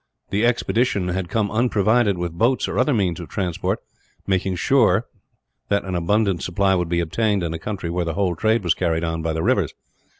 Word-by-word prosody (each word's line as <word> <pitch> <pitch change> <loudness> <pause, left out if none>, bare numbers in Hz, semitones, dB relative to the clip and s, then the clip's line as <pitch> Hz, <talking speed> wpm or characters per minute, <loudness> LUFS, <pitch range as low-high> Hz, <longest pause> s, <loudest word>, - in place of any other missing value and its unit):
The 105 +4 +2
expedition 115 -5 +1
had 90 0 -2
come 105 -1 0
unprovided 110 -2 +2
with 85 -1 -3
boats 120 +9 +1
or - - -2
other 130 +4 +3
means 95 - 0
of 85 - -8
transport, 90 -4 -2 0.4
making 95 -1 0
sure 110 0 +3 0.6
that 100 -1 +1
an 95 - -4
abundant 95 +2 +1
supply 95 +2 +1
would 90 -2 0
be 85 0 +1
obtained, 100 +3 0
in 80 -1 -2
a 80 - -5
country 90 -2 -4
where 90 0 -1
the 85 -2 -3
whole 95 -3 0
trade 110 +5 +1
was 85 -3 +3
carried 80 -1 -1
on 80 -1 -2
by 80 0 -1
the 80 0 -2
rivers. 100 - +1
95 Hz, 200 wpm, -22 LUFS, 85-110 Hz, 0.6 s, other